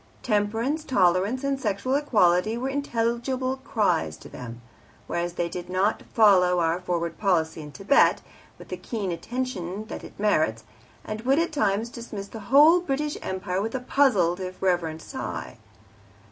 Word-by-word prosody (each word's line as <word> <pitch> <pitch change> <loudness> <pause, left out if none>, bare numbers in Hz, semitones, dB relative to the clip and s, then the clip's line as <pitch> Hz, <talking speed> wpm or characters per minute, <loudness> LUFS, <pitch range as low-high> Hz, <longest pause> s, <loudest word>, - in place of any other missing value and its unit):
Temperance, 225 +7 0
tolerance, 200 - +2
and 275 -1 0
sexual 215 +2 -1
equality 215 -7 +3
were 260 +2 -2
intelligible 255 -1 -1
cries 200 - 0
to - - -13
them; 120 -2 -8 0.5
whereas 170 0 -2
they 175 -1 -1
did 175 +1 -7
not 190 +4 +1
follow 185 -5 +5
our 165 +1 +1
Forward 170 -2 -3
Policy 165 -6 +1
in 150 -1 -9
Thibet 200 - +3 0.3
with - - -13
the - - -4
keen 205 -6 -4
attention 205 0 -4
that - - -6
it - - -12
merits, 155 - +1 0.4
and 215 0 -5
would 265 +4 +2
at 335 0 +1
times 215 -4 0
dismiss 215 -5 -7
the 225 - -8
whole 300 +6 +7
British 300 -3 -2
Empire 190 0 -3
with 225 +4 -3
a - - 0
puzzled, 215 -10 +2
if 185 0 -6
reverent, 170 -4 0
sigh. 265 - -6
205 Hz, 155 wpm, -25 LUFS, 180-255 Hz, 0.5 s, whole